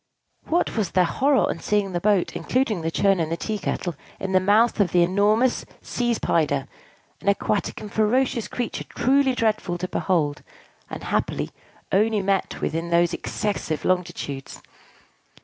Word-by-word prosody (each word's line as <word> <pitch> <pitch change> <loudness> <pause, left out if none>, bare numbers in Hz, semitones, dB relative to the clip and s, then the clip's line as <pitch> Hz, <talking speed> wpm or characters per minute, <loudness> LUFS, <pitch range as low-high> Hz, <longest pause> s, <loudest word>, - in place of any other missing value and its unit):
What 345 +2 0
was 210 -6 0
their 185 - +5
horror 270 +8 +2
on - - -3
seeing 205 +1 0
the 175 - -1
boat 205 -3 +2
(including 220 0 0
the 160 - -1
churn 195 +2 +2
and 160 -1 -1
the 165 - -1
tea 215 +2 -3
kettle) 175 -1 -2 0.3
in 190 - -3
the 185 - +5
mouth 210 +5 +3
of 180 -4 +2
an 175 - +6
enormous 205 +7 +2 0.2
Seeze 240 -2 -1
Pyder, 145 -4 0 0.5
an - - -10
aquatic 200 +1 0
and 210 -1 -8
ferocious 235 +2 +1
creature 245 -2 -4
truly 270 0 +2
dreadful 215 -6 0
to 185 +1 -3
behold, 155 -7 0 0.5
and, - - -7
happily, - - -1 0.4
only 210 +1 +2
met 195 -1 -1
with - - -1
in 165 +1 -2
those 170 0 +3
excessive 200 -7 -3
longitudes! 170 -7 -2
195 Hz, 160 wpm, -24 LUFS, 175-220 Hz, 0.5 s, an